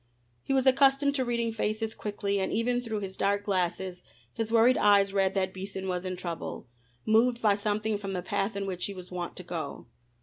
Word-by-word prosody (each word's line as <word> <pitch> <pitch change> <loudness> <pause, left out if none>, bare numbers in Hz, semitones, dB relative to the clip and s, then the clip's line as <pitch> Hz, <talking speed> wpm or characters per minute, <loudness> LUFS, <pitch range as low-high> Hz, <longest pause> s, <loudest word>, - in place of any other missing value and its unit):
He - - -5
was 265 -1 +2
accustomed 275 +1 +4
to 270 -2 0
reading 235 -2 -1
faces 220 0 -2
quickly 205 -1 -2
and 190 - -1
even 245 +2 +1
through 220 -3 -3
his 190 -1 -5
dark 200 +1 +1
glasses 185 -1 -1 0.3
his 225 -1 -3
worried 235 +2 +5
eyes 200 -1 +4
read 195 -1 +2
that 190 -1 0
Beason 190 0 -6
was 180 0 -2
in 185 0 -2
trouble, 175 -2 -5 0.4
moved 235 +2 +3
by 215 -3 +4
something 210 +1 -1
from 195 -1 -4
the 180 -1 -3
path 195 +4 -1
in 200 0 -2
which 185 -2 -1
he 200 - -4
was 180 -1 -10
wont 175 -1 -4
to 185 - -7
go. 170 -2 -5
205 Hz, 205 wpm, -29 LUFS, 190-225 Hz, 0.4 s, worried